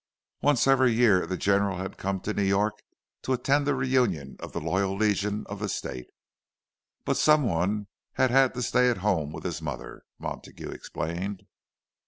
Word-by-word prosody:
Once 145 Hz, -4 st, +3 dB
every 130 Hz, -2 st, +5 dB
year 110 Hz, -7 st, +4 dB
the 95 Hz, +1 st, -2 dB
General 100 Hz, -1 st, +2 dB
had 95 Hz, +1 st, -5 dB
come 95 Hz, 0 st, -1 dB
to 105 Hz, -, -3 dB
New 100 Hz, -, -1 dB
York 100 Hz, +2 st, +2 dB, 0.5 s
to 130 Hz, -, -1 dB
attend 140 Hz, +3 st, +1 dB
the 145 Hz, -, +2 dB
reunion 125 Hz, -, 0 dB
of -, -, -8 dB
the -, -, -3 dB
Loyal 95 Hz, 0 st, 0 dB
Legion 105 Hz, 0 st, 0 dB
of 100 Hz, 0 st, -7 dB
the 105 Hz, -1 st, -2 dB
State; 60 Hz, -8 st, -5 dB, 1.0 s
but -, -, +1 dB
some 150 Hz, -1 st, +5 dB
one 100 Hz, +1 st, 0 dB, 0.3 s
had 130 Hz, -, +2 dB
had 135 Hz, -1 st, +4 dB
to 125 Hz, -, -2 dB
stay 125 Hz, +1 st, +3 dB
at 120 Hz, -, 0 dB
home 80 Hz, -8 st, +1 dB
with -, -, -8 dB
his 85 Hz, -3 st, -3 dB
mother, 70 Hz, -4 st, -6 dB, 0.2 s
Montague -, -, -7 dB
explained. 90 Hz, +5 st, -5 dB
100 Hz, 175 wpm, -27 LUFS, 95-125 Hz, 1.0 s, every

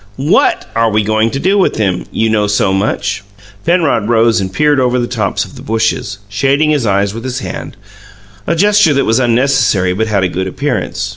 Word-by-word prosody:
"WHAT 140 Hz, +3 st, +2 dB
are 115 Hz, 0 st, +2 dB
we 105 Hz, 0 st, +1 dB
goin' 110 Hz, +2 st, +1 dB
to 135 Hz, -, -4 dB
do 195 Hz, +6 st, +2 dB
with 190 Hz, -, +1 dB
him, 95 Hz, -5 st, -1 dB
you 115 Hz, -, 0 dB
know 105 Hz, -2 st, +1 dB
so 105 Hz, -1 st, +1 dB
much?" 100 Hz, 0 st, -1 dB, 0.4 s
Penrod 160 Hz, -, +1 dB
rose 115 Hz, -2 st, +3 dB
and 95 Hz, -1 st, -4 dB
peered 150 Hz, +5 st, +2 dB
over 125 Hz, -1 st, +1 dB
the 120 Hz, -, 0 dB
tops 110 Hz, -5 st, -2 dB
of -, -, -15 dB
the -, -, -11 dB
bushes, 110 Hz, -1 st, -1 dB
shading 140 Hz, +8 st, +1 dB
his 140 Hz, -7 st, 0 dB
eyes 100 Hz, 0 st, +1 dB
with 115 Hz, +1 st, -7 dB
his 130 Hz, 0 st, -4 dB
hand, 125 Hz, -2 st, -7 dB, 0.7 s
a 170 Hz, -, +1 dB
gesture 205 Hz, -3 st, +3 dB
that 140 Hz, -, +1 dB
was 115 Hz, +3 st, +2 dB
unnecessary 120 Hz, -6 st, +2 dB
but 110 Hz, +4 st, -1 dB
had 100 Hz, -3 st, 0 dB
a -, -, +2 dB
good 95 Hz, +1 st, -3 dB
appearance. 105 Hz, -4 st, -3 dB
115 Hz, 205 wpm, -14 LUFS, 105-135 Hz, 0.7 s, rose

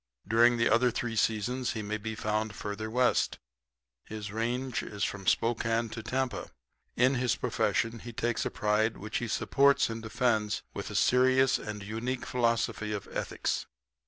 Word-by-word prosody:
During 120 Hz, +2 st, +5 dB
the 115 Hz, -, +3 dB
other 125 Hz, +2 st, +4 dB
three 120 Hz, -1 st, -3 dB
seasons 115 Hz, +3 st, 0 dB
he 110 Hz, -, -4 dB
may 105 Hz, +1 st, -2 dB
be 110 Hz, +1 st, -4 dB
found 105 Hz, 0 st, -1 dB
further 105 Hz, +1 st, -4 dB
west 125 Hz, +2 st, +2 dB, 0.7 s
his 105 Hz, -1 st, -7 dB
range 120 Hz, +3 st, -1 dB
is 100 Hz, -1 st, -5 dB
from 100 Hz, -2 st, -3 dB
Spokane 115 Hz, 0 st, +1 dB
to 115 Hz, -, -6 dB
Tampa. 130 Hz, -1 st, -2 dB, 0.5 s
In 130 Hz, +2 st, +4 dB
his 120 Hz, -2 st, +2 dB
profession 115 Hz, 0 st, 0 dB
he 120 Hz, -, -8 dB
takes 120 Hz, +1 st, -1 dB
a -, -, -1 dB
pride 110 Hz, +2 st, +1 dB
which 105 Hz, +2 st, -4 dB
he 120 Hz, -, -3 dB
supports 140 Hz, +3 st, +3 dB
and 115 Hz, 0 st, -5 dB
defends 110 Hz, -2 st, 0 dB
with -, -, -5 dB
a -, -, -7 dB
serious 130 Hz, +1 st, +4 dB
and 105 Hz, -1 st, -6 dB
unique 115 Hz, +5 st, -3 dB
philosophy 115 Hz, -3 st, 0 dB
of 100 Hz, -, -5 dB
ethics. -, -, -2 dB
115 Hz, 160 wpm, -30 LUFS, 110-125 Hz, 0.7 s, During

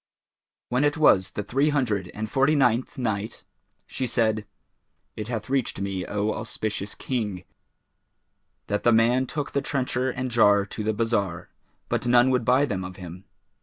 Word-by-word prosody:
When 125 Hz, +3 st, +1 dB
it 145 Hz, +1 st, +2 dB
was 95 Hz, -11 st, +4 dB
the 105 Hz, -, -3 dB
Three 135 Hz, +8 st, +1 dB
Hundred 110 Hz, -11 st, 0 dB
and 110 Hz, +1 st, -3 dB
Forty 135 Hz, +7 st, +2 dB
ninth 125 Hz, -3 st, +1 dB
Night, 110 Hz, -4 st, -3 dB, 0.4 s
She 130 Hz, -, -3 dB
said, 110 Hz, -3 st, 0 dB, 0.7 s
It 105 Hz, -, -5 dB
hath 115 Hz, -2 st, -4 dB
reached 135 Hz, -7 st, -1 dB
me, 95 Hz, -2 st, -3 dB
O 105 Hz, +1 st, -1 dB
auspicious 105 Hz, -2 st, -4 dB
King, 105 Hz, -8 st, -3 dB, 1.2 s
that 105 Hz, -, -1 dB
the 120 Hz, -, +4 dB
man 120 Hz, +3 st, +3 dB
took 145 Hz, +1 st, -4 dB
the 140 Hz, -, 0 dB
trencher 130 Hz, -2 st, -1 dB
and 130 Hz, 0 st, -3 dB
jar 105 Hz, -4 st, +4 dB
to 105 Hz, +2 st, -6 dB
the 110 Hz, 0 st, 0 dB
bazar, 100 Hz, -6 st, -1 dB, 0.4 s
but -, -, -1 dB
none 120 Hz, +1 st, +5 dB
would 125 Hz, -2 st, +1 dB
buy 130 Hz, +4 st, +4 dB
them 100 Hz, -8 st, -3 dB
of 90 Hz, 0 st, -7 dB
him. 90 Hz, +1 st, -10 dB
115 Hz, 165 wpm, -25 LUFS, 100-130 Hz, 1.2 s, none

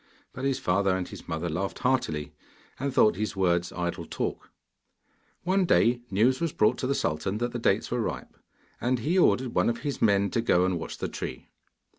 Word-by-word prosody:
But 130 Hz, -, -5 dB
his 135 Hz, -1 st, +1 dB
father 95 Hz, +1 st, +1 dB
and 90 Hz, -, -4 dB
his -, -, -11 dB
mother 80 Hz, 0 st, -2 dB
laughed 90 Hz, +5 st, -3 dB
heartily, 125 Hz, -, 0 dB, 0.5 s
and 140 Hz, +1 st, -1 dB
thought 105 Hz, -6 st, +4 dB
his 105 Hz, -1 st, -2 dB
words 90 Hz, -2 st, +1 dB
idle 90 Hz, -1 st, -3 dB
talk. -, -, -4 dB, 0.9 s
One 190 Hz, +2 st, +2 dB
day, 120 Hz, -7 st, +3 dB
news 120 Hz, +7 st, +2 dB
was 165 Hz, -2 st, 0 dB
brought 105 Hz, -, +2 dB
to 130 Hz, -, -1 dB
the 140 Hz, -, +1 dB
sultan 85 Hz, -, -1 dB
that 120 Hz, +2 st, -2 dB
the 120 Hz, -, -4 dB
dates 105 Hz, -2 st, +1 dB
were 120 Hz, 0 st, 0 dB
ripe, -, -, -4 dB, 0.5 s
and 125 Hz, +1 st, +1 dB
he 160 Hz, +11 st, +1 dB
ordered 130 Hz, -7 st, +3 dB
one -, -, +3 dB
of 115 Hz, 0 st, -3 dB
his 140 Hz, 0 st, -3 dB
men 100 Hz, -2 st, +3 dB
to 115 Hz, -, +1 dB
go 90 Hz, -5 st, +3 dB
and 90 Hz, -2 st, 0 dB
watch -, -, -6 dB
the -, -, -3 dB
tree. -, -, -6 dB
110 Hz, 200 wpm, -27 LUFS, 90-130 Hz, 0.9 s, thought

